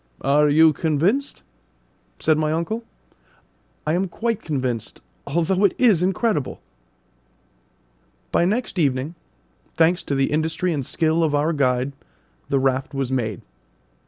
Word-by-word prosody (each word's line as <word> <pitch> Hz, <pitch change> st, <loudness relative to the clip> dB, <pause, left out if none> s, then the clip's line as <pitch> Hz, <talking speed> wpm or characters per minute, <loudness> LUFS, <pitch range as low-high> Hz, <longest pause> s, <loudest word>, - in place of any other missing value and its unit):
"Are 145 Hz, +2 st, +3 dB
you 160 Hz, +2 st, +6 dB
convinced?" 170 Hz, -, 0 dB, 0.7 s
said 155 Hz, -, +2 dB
my 155 Hz, 0 st, 0 dB
uncle. 170 Hz, +9 st, -2 dB, 1.0 s
"I 155 Hz, -, +1 dB
am 185 Hz, +3 st, 0 dB
quite 225 Hz, +4 st, -2 dB
convinced, 130 Hz, -7 st, -3 dB, 0.3 s
although 170 Hz, +6 st, +1 dB
it 200 Hz, -, +3 dB
is 220 Hz, -9 st, +4 dB
incredible!" 190 Hz, -, 0 dB, 1.7 s
By 170 Hz, -, +3 dB
next 210 Hz, 0 st, -1 dB
evening, 140 Hz, 0 st, 0 dB, 0.6 s
thanks 165 Hz, +3 st, +3 dB
to 140 Hz, -, -1 dB
the 135 Hz, 0 st, +1 dB
industry 160 Hz, +3 st, 0 dB
and 140 Hz, -3 st, -2 dB
skill 160 Hz, +5 st, +1 dB
of 150 Hz, -2 st, +1 dB
our 150 Hz, +3 st, +1 dB
guide, 130 Hz, -2 st, 0 dB, 0.6 s
the 140 Hz, -, +2 dB
raft 135 Hz, +2 st, 0 dB
was 135 Hz, -2 st, -2 dB
made. 110 Hz, -6 st, -2 dB
155 Hz, 130 wpm, -22 LUFS, 140-180 Hz, 1.7 s, you